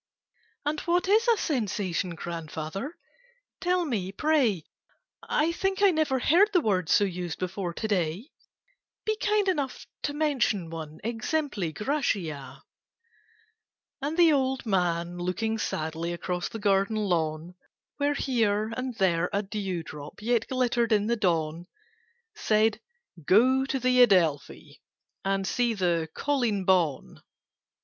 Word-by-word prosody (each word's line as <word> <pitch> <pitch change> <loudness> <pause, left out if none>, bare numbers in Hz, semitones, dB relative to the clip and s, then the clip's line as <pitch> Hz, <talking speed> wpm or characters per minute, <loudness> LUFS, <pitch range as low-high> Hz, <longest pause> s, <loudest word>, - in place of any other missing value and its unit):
"And 300 +1 0
what 350 +1 +1
is 435 +4 +4
a 465 -2 +5
Sensation, 200 - -1
Grandfather, 165 - -5 0.6
tell 360 -1 +1
me, 200 - -2
pray? 245 - +1 0.6
I 315 +2 +1
think 385 +3 -1
I 395 - +7
never 310 -5 +1
heard 345 - +4
the 360 - +5
word 185 - 0
So - - +5
used 180 -4 -3
before 185 0 -3
to 220 - -3
day: 190 - -1 0.7
Be 435 - +1
kind 420 -1 +1
enough 290 -8 -1 0.2
to 290 - -2
mention 260 - 0
one 155 -2 -7
'Exempli 235 - -2
gratiâ.'" 160 - -2 1.4
And 295 +4 -2
the 335 -3 +6
old 265 -2 0
man, 175 -3 0
looking 220 +5 -1
sadly 160 -1 -3
Across 180 +1 -3
the - - -6
garden 200 0 +2
lawn, 170 -5 -1 0.4
Where 290 0 +1
here 220 -5 0
and 255 0 -4
there 180 -5 +1
a 200 +1 0
dew 195 -4 -3
drop 150 -2 -10
Yet 230 +1 0
glittered 245 -2 +1
in 210 -1 +3
the 235 +2 +1
dawn, 170 -4 -1 0.7
Said 215 - +2 0.4
"Go 255 - +4
to 270 0 -2
the 250 0 +4
Adelphi, 175 -11 +2 0.4
And 195 0 0
see 235 +3 0
the 170 -4 0
'Colleen 240 -9 0
Bawn. 175 -7 +1
210 Hz, 130 wpm, -27 LUFS, 175-270 Hz, 1.4 s, I